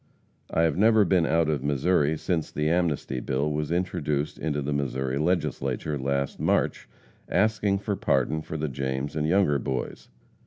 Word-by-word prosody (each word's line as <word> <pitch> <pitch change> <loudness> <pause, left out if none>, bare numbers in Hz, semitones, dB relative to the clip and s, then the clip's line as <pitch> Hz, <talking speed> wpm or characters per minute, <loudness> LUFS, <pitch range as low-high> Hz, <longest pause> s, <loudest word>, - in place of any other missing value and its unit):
I 80 - +1
have 80 - +1
never 110 +1 +5
been 85 -2 +3
out 80 -1 +2
of 75 -4 -1
Missouri 75 +2 +2
since 80 -1 -1
the 75 +1 -1
Amnesty 80 -6 0
Bill 70 +4 -1
was 75 +1 -2
introduced 80 -5 -1
into 75 -2 -2
the 75 +2 -1
Missouri 65 -1 -1
Legislature, 75 -4 -1
last 70 +1 -1
March, - - 0 0.4
asking 105 -1 +2
for 100 +1 -2
pardon 75 -1 +1
for 80 - -6
the 80 0 -2
James 65 +1 -3
and 75 0 0
Younger 85 -5 +3
Boys. 65 -1 -4
75 Hz, 160 wpm, -26 LUFS, 70-85 Hz, 0.4 s, never